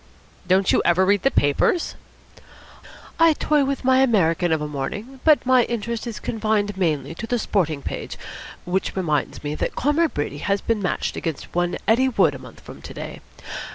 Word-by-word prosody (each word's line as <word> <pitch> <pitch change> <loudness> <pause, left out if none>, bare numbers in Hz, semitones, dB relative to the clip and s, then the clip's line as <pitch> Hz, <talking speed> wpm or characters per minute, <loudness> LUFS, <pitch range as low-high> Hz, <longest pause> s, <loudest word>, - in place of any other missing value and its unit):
"Don't 185 +1 +3
you - - +3
ever 180 +2 +3
read 200 0 +3
the 270 - +3
papers?" 145 - +1 1.3
"I 330 -1 +6
toy 300 -1 +2
with 275 0 -2
my 260 0 +4
American 175 -9 +2
of 160 - +2
a 150 - -3
morning, 205 - -5
but 310 -4 +4
my 255 -1 +5
interest 235 0 -3
is 230 - -5
confined 215 -2 -1
mainly 155 -6 -1
to 225 +7 -7
the 245 - 0
sporting 160 -10 -1
page - - -5 0.5
which 185 +2 -1
reminds 155 -7 -1
me 145 0 -3
that - - -3
Comrade 295 +3 +1
Brady 145 0 -3
has 200 +4 0
been 225 0 -1
matched 185 - -2
against 160 -4 -5
one 175 0 0
Eddie 255 +4 +4
Wood 250 - +3
a - - -8
month - - -13
from - - -12
to - - -10
day. - - -7
205 Hz, 185 wpm, -22 LUFS, 165-250 Hz, 1.3 s, I